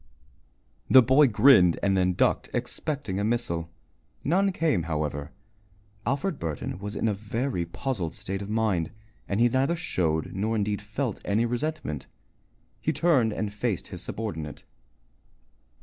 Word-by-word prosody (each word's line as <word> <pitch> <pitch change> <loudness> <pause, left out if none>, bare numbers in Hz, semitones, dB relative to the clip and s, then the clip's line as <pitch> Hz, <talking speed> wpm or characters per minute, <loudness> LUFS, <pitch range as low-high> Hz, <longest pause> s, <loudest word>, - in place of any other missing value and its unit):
The 130 -1 +9
boy 135 +4 +6
grinned 105 -6 +6
and 100 -1 +3
then 90 -1 +2
ducked, - - +1
expecting 135 -11 -3
a - - 0
missile. 105 -8 -1 0.5
None 195 +6 +2
came, 160 - +1
however. 75 -1 -2 0.8
Alfred 155 +4 -1
Burton 80 +2 -4
was 105 +1 -5
in - - 0
a 105 - +2
very 110 -1 -2
puzzled 85 - -3
state 95 +1 -4
of 100 - -6
mind, 105 -7 +1 0.4
and 100 - -1
he 120 - +6
neither 130 +7 +1
showed 85 - -1
nor 110 +4 -1
indeed 105 -1 -1
felt 110 +2 -3
any 110 +3 +1
resentment. 120 - -3 0.7
He - - +1
turned 135 -10 +3
and 105 -1 -3
faced 105 -3 -2
his - - -7
subordinate. 80 -9 -5
105 Hz, 140 wpm, -27 LUFS, 90-130 Hz, 0.8 s, The